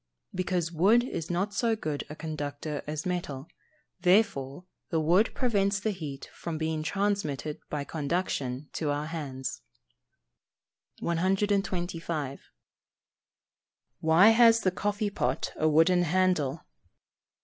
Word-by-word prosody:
_ -, -, -11 dB
Because 180 Hz, -2 st, -1 dB
wood 200 Hz, +9 st, +4 dB
is 165 Hz, -10 st, -4 dB
not 190 Hz, +4 st, -1 dB
so 225 Hz, +3 st, +1 dB
good 155 Hz, -9 st, -3 dB
a 150 Hz, -, -7 dB
conductor 150 Hz, -1 st, -4 dB
as 150 Hz, 0 st, -4 dB
metal, 165 Hz, -6 st, -3 dB, 0.5 s
therefore 180 Hz, -5 st, +2 dB, 0.2 s
the 165 Hz, -, +1 dB
wood 175 Hz, +8 st, +4 dB
prevents 200 Hz, -5 st, +1 dB
the 215 Hz, +2 st, 0 dB
heat 150 Hz, -8 st, -6 dB
from 165 Hz, -2 st, -5 dB
being 160 Hz, 0 st, -1 dB
transmitted 160 Hz, -6 st, -1 dB
by 150 Hz, -1 st, -2 dB
conduction 145 Hz, -3 st, -2 dB
to 155 Hz, -, -2 dB
our 145 Hz, +1 st, -1 dB
hands. 135 Hz, -7 st, -5 dB, 1.4 s
125. 175 Hz, -5 st, -1 dB, 1.5 s
_Why 170 Hz, +8 st, +6 dB
has 230 Hz, 0 st, +6 dB
the 185 Hz, -, +2 dB
coffee 205 Hz, +2 st, -1 dB
pot 130 Hz, -9 st, -1 dB
a 155 Hz, -, +2 dB
wooden 165 Hz, +4 st, +4 dB
handle? 175 Hz, -4 st, +1 dB
165 Hz, 115 wpm, -28 LUFS, 150-195 Hz, 1.5 s, Why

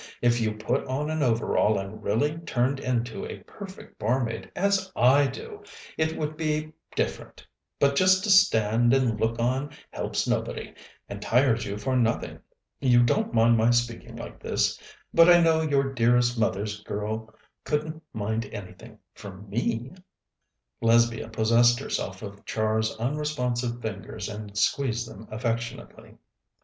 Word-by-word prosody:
If 120 Hz, 0 st, +2 dB
you 110 Hz, -1 st, 0 dB
put 115 Hz, +5 st, -1 dB
on 145 Hz, +4 st, -2 dB
an 155 Hz, -1 st, -1 dB
overall, 115 Hz, -4 st, +2 dB
and 95 Hz, +2 st, -6 dB
really 145 Hz, +10 st, 0 dB
turned 130 Hz, -3 st, 0 dB
into 120 Hz, -3 st, -2 dB
a -, -, -7 dB
perfect 195 Hz, -2 st, -11 dB
barmaid, 120 Hz, +1 st, -1 dB
as 190 Hz, -1 st, +1 dB
I 135 Hz, +4 st, +5 dB
do, 425 Hz, -, -8 dB, 0.3 s
it 160 Hz, 0 st, -1 dB
would 155 Hz, 0 st, -3 dB
be 155 Hz, 0 st, -2 dB, 0.2 s
different, -, -, -3 dB, 0.3 s
but 140 Hz, 0 st, +3 dB
just 185 Hz, +4 st, +4 dB
to 210 Hz, -, +1 dB
stand 120 Hz, -, +4 dB
and 120 Hz, -5 st, +1 dB
look 115 Hz, +1 st, 0 dB
on 130 Hz, +4 st, 0 dB, 0.2 s
helps -, -, -2 dB
nobody, -, -, -2 dB, 0.3 s
and 100 Hz, 0 st, -7 dB
tires 120 Hz, -1 st, +2 dB
you 100 Hz, -, -4 dB
for 130 Hz, +5 st, -1 dB
nothing. 115 Hz, -2 st, 0 dB, 0.4 s
You 120 Hz, -3 st, +5 dB
don't 120 Hz, -, +1 dB
mind 115 Hz, +1 st, +5 dB
my 115 Hz, +1 st, +4 dB
speaking 120 Hz, -1 st, -1 dB
like -, -, -9 dB
this? -, -, 0 dB, 0.3 s
But 165 Hz, +1 st, +7 dB
I 175 Hz, 0 st, +8 dB
know 165 Hz, -1 st, +4 dB
your 140 Hz, -3 st, +1 dB
dearest 120 Hz, 0 st, +3 dB
mother's 105 Hz, -2 st, -1 dB
girl 110 Hz, +2 st, -4 dB, 0.3 s
couldn't 155 Hz, +1 st, -2 dB
mind 110 Hz, +1 st, -3 dB
anything, 90 Hz, -3 st, -10 dB, 0.2 s
from 100 Hz, 0 st, -11 dB
me!" 120 Hz, +3 st, -1 dB, 0.9 s
Lesbia 115 Hz, -1 st, +3 dB
possessed 115 Hz, +2 st, +4 dB
herself 100 Hz, -7 st, -4 dB
of 100 Hz, -1 st, -9 dB
Char's 110 Hz, 0 st, -1 dB
unresponsive 125 Hz, -2 st, -2 dB
fingers 105 Hz, -1 st, -5 dB
and 105 Hz, -1 st, -7 dB
squeezed 115 Hz, +1 st, +1 dB
them 110 Hz, +1 st, -11 dB
affectionately. 115 Hz, +1 st, -4 dB
120 Hz, 145 wpm, -26 LUFS, 110-140 Hz, 0.9 s, I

